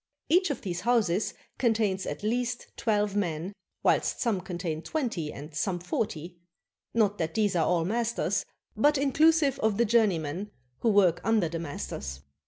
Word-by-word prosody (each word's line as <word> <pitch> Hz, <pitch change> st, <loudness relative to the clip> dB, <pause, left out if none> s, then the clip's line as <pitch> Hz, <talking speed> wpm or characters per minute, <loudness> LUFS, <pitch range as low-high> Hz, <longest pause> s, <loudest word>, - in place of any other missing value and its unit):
Each 365 Hz, +2 st, +4 dB
of 285 Hz, -, -3 dB
these 180 Hz, -3 st, -3 dB
houses 215 Hz, -4 st, +1 dB, 0.2 s
contains 215 Hz, -6 st, +1 dB
at -, -, -5 dB
least 240 Hz, +2 st, -2 dB
twelve 210 Hz, -2 st, 0 dB
men, 175 Hz, -1 st, -1 dB, 0.3 s
whilst -, -, +2 dB
some 220 Hz, -7 st, 0 dB
contain 175 Hz, -3 st, -4 dB
twenty 225 Hz, -, -2 dB
and 150 Hz, +2 st, -9 dB
some 175 Hz, +5 st, -1 dB
forty, 175 Hz, -1 st, -3 dB, 0.3 s
— -, -, -60 dB
not 205 Hz, -3 st, +2 dB
that 160 Hz, -1 st, -2 dB
these 205 Hz, -3 st, +2 dB
are 165 Hz, -2 st, +2 dB
all 170 Hz, -2 st, +2 dB
masters, 235 Hz, +4 st, 0 dB, 0.3 s
but 295 Hz, 0 st, +4 dB
inclusive 285 Hz, +1 st, +3 dB
of 220 Hz, -2 st, +1 dB
the 235 Hz, -, +4 dB
journeymen 200 Hz, -5 st, +1 dB, 0.3 s
who 235 Hz, -, +2 dB
work 195 Hz, -5 st, +4 dB
under 220 Hz, -6 st, +2 dB
the 165 Hz, 0 st, -4 dB
masters. 70 Hz, -, -5 dB
205 Hz, 160 wpm, -28 LUFS, 170-235 Hz, 0.3 s, Each